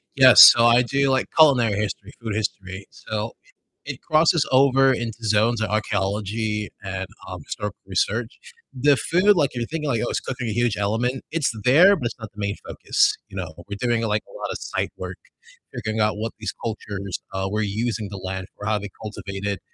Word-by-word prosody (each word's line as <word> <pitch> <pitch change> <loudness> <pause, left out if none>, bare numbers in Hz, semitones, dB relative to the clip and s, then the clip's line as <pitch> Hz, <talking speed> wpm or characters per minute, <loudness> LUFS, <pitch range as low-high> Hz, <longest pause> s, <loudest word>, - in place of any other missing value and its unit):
Yeah, 130 -2 +8
so 115 0 +10
I 120 +1 +6
do, 135 +2 0
like, 130 -1 +1
culinary 130 -9 +5
history, 105 0 -4
food 110 -2 -4
history. 95 -2 -4
So, 110 +1 -5
it - - -26 0.4
it - - -22
crosses 160 +1 +3
over 135 0 +5
into 115 -2 -4
zones 110 +2 +2
of 110 - -1
archeology 105 0 -2
and, 95 -1 -4 0.2
um, - - -7
historical 105 -2 -5
research. 110 +4 -1 0.4
The 140 +1 +3
food, 185 +4 +3
like 145 -5 +1
you're 120 -1 -3
thinking 155 -2 -4
like, 115 -5 0
"Oh, - - -2
is - - -1
cooking 125 -2 -5
a - - -2
huge 120 -2 +1
element?" 115 +6 -1
It's 160 -6 0
there, 175 +10 +6
but 125 - -5
it's - - -7
not 110 -2 -9
the 105 - -14
main 100 0 -2
focus, - - +1 0.2
you 95 - -10
know, 90 -4 -5
we're 100 0 -6
doing, 120 -2 0
like, 105 -1 0
a - - -17
lot - - -4
of - - -4
site - - -3
work, - - -7 0.6
figuring 110 0 -3
out 105 -1 +2
what 110 +1 -3
these 110 - -3
cultures, 100 -4 -5
uh, 95 0 -2
were 105 - -1
using 110 +1 -2
the 100 - -7
land 95 0 -5
for, 105 - -8
how 110 -1 0
they 100 - -7
cultivated, 100 -2 -5
110 Hz, 200 wpm, -23 LUFS, 100-125 Hz, 0.6 s, so